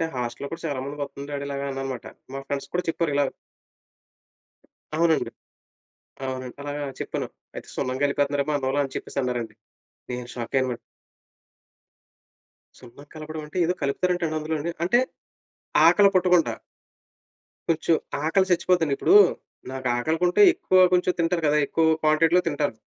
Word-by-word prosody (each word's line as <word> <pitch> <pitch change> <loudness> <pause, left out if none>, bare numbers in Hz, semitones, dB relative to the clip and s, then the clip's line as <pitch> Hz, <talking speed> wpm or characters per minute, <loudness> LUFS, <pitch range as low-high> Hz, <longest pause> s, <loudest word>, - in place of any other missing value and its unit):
హాస్టల్‌లో 125 +3 -4
కూడా 165 0 -7
చాలా 140 -3 -2
మంది 145 +1 -6
కొత్తుంది 140 0 -8
డ్యాడీ 140 0 -4
ఇలాగా 140 0 -3
అన్నానుమాట. 135 -2 -5 0.3
మా - - -3
ఫ్రెండ్స్‌కు 140 -1 -4
కూడా 180 - 0
చెప్పారు 165 -2 -1
ఇలా 145 0 +3 1.7
అవునండి. 165 -1 +2 1.0
అవునండి. 130 -1 -5
అలాగా 145 0 -4 0.2
చెప్పాను. - - -3 0.3
"అయితే - - -8
సున్నం 130 0 -2
గలిపేత్తన్నారమో 145 +1 +1
అన్నంలో" 135 0 0
అని 135 - -7
చెప్పేసన్నారండి. 120 -5 -3 0.6
నేను 125 0 -5
షాక్ 120 -2 -6
అయ్యానుమాట. 130 -2 +1 2.0
సున్నం 125 +4 -14
కలపడం 155 0 -6
అంటే, 150 - -8
ఏదో 175 - +1
కలుపుతారంటండి 165 +3 0
అందులోనే. 155 +1 -2
అంటే, 240 +7 +4 0.9
ఆకలి 200 -1 +7
పుట్టకుండా. 180 -2 +4 1.2
కొంచెం 165 0 +2 0.3
ఆకలి 185 +4 +3
సచ్చిపోద్దండి. 175 -4 +2
ఇప్పుడు 385 - +4 0.6
నాకు 130 -1 -4
ఆకలిగుంటే 165 - +2
ఎక్కువ 185 - +2
కొంచెం 180 0 +3
తింటరు 170 +1 +1
కదా! 150 +1 +3
ఎక్కువ 165 - +1 0.2
క్వాంటిటీలో 160 +3 +4
తింటారు. 145 -4 0
145 Hz, 125 wpm, -25 LUFS, 135-165 Hz, 2.0 s, ఆకలి